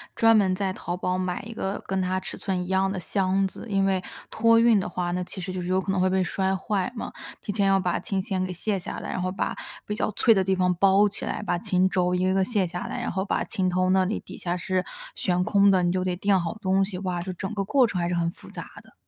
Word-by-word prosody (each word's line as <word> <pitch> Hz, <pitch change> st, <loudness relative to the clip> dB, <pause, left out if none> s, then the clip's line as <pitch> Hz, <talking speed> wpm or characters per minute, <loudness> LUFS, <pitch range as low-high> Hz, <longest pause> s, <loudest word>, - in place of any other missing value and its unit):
专 225 Hz, -1 st, +5 dB
门 190 Hz, -3 st, +3 dB
在 190 Hz, 0 st, -1 dB
淘 175 Hz, -1 st, -4 dB
宝 180 Hz, 0 st, -1 dB
买 185 Hz, -1 st, -2 dB
一 230 Hz, -, -8 dB
个 195 Hz, -2 st, -3 dB
跟 190 Hz, 0 st, -1 dB
它 185 Hz, 0 st, 0 dB
尺 -, -, -5 dB
寸 185 Hz, -2 st, -2 dB
一 180 Hz, -, -7 dB
样 190 Hz, 0 st, +2 dB
的 195 Hz, -, -3 dB
箱 190 Hz, +2 st, +1 dB
子， 190 Hz, -, -6 dB
因 195 Hz, -2 st, +1 dB
为， 190 Hz, -1 st, +1 dB, 0.3 s
托 230 Hz, 0 st, +4 dB
运 230 Hz, -3 st, +5 dB
的 -, -, -2 dB
话， 175 Hz, 0 st, -2 dB
那 180 Hz, +1 st, -1 dB
其 190 Hz, -, -7 dB
实 185 Hz, +1 st, -4 dB
就 185 Hz, -, -4 dB
是 175 Hz, -, -5 dB
有 185 Hz, +1 st, +2 dB
可 190 Hz, -, -2 dB
能 195 Hz, -, 0 dB
会 185 Hz, 0 st, +3 dB
被 190 Hz, 0 st, +2 dB
摔 190 Hz, +2 st, 0 dB
坏 195 Hz, +1 st, -1 dB
嘛， -, -, -5 dB, 0.3 s
提 205 Hz, -, -4 dB
前 200 Hz, -1 st, +1 dB
要 195 Hz, -, +4 dB
把 180 Hz, -2 st, 0 dB
琴 190 Hz, +2 st, -2 dB
弦 190 Hz, -3 st, -2 dB
给 185 Hz, -, -4 dB
卸 195 Hz, +2 st, -1 dB
下 -, -, -6 dB
来， -, -, -6 dB
然 185 Hz, -, -2 dB
后 185 Hz, -, -1 dB
把 -, -, -1 dB, 0.3 s
比 210 Hz, -, -3 dB
较 -, -, 0 dB
脆 225 Hz, +3 st, +4 dB
的 195 Hz, -3 st, +2 dB
地 190 Hz, -, +2 dB
方 180 Hz, -1 st, +2 dB
包 195 Hz, +3 st, +4 dB
起 200 Hz, -, -6 dB
来， -, -, -3 dB
把 195 Hz, -4 st, -1 dB
琴 185 Hz, +1 st, +1 dB
轴 180 Hz, -1 st, +1 dB
一 180 Hz, -, +1 dB
个 190 Hz, -, +2 dB
个 190 Hz, -1 st, +3 dB
卸 205 Hz, -6 st, +1 dB
下 175 Hz, +1 st, -5 dB
来， -, -, -4 dB
然 -, -, -2 dB
后 190 Hz, +1 st, -2 dB
把 -, -, 0 dB
琴 185 Hz, -1 st, -1 dB
头 185 Hz, +1 st, +1 dB
那 190 Hz, 0 st, +4 dB
里 210 Hz, +4 st, -2 dB
底 -, -, -11 dB
下 175 Hz, 0 st, -2 dB
是 185 Hz, +1 st, -1 dB, 0.3 s
悬 180 Hz, 0 st, 0 dB
空 200 Hz, +1 st, +4 dB
的， 185 Hz, -2 st, +4 dB
你 175 Hz, -, +2 dB
就 185 Hz, 0 st, -1 dB
得 180 Hz, -1 st, 0 dB
垫 195 Hz, +1 st, +2 dB
好 170 Hz, +5 st, -3 dB
东 195 Hz, 0 st, +2 dB
西。 190 Hz, -2 st, -6 dB
哇， 180 Hz, -2 st, -2 dB
这 185 Hz, +1 st, -5 dB
整 190 Hz, +4 st, -5 dB
个 200 Hz, -2 st, -2 dB
过 265 Hz, +3 st, +4 dB
程 190 Hz, -5 st, -2 dB
还 170 Hz, -, 0 dB
是 175 Hz, -, -1 dB
很 170 Hz, 0 st, 0 dB
复 -, -, -13 dB
杂 -, -, -7 dB, 0.2 s
的。 -, -, -22 dB
190 Hz, 310 characters per minute, -25 LUFS, 180-195 Hz, 0.3 s, 专